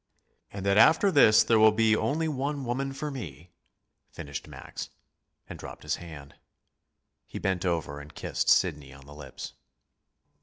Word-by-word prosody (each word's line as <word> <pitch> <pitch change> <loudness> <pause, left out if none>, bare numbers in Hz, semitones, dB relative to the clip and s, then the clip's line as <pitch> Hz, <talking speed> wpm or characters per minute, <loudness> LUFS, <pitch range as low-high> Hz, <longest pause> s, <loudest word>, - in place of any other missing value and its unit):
" - - -46
and 100 -1 -7
that 100 +1 +2
after 165 - +5
this 120 -9 +6
there 115 -1 +3
will 110 0 +7
be 110 0 +3
only 160 +8 -1
one 140 -1 -3
woman 135 +3 -2
for 150 +2 -5
me," 90 - -9 0.6
finished 70 -1 -8
Max, - - -8 0.6
and - - -9
dropped - - -10
his - - -2
hand. 75 -5 -11 0.9
He - - -8
bent 95 -1 -1
over 80 -4 -2
and 75 +1 -11
kissed - - -2
Sidney 70 -2 +2
on 70 -1 -15
the 75 - -13
lips. 75 -3 -9
100 Hz, 160 wpm, -27 LUFS, -, 0.9 s, will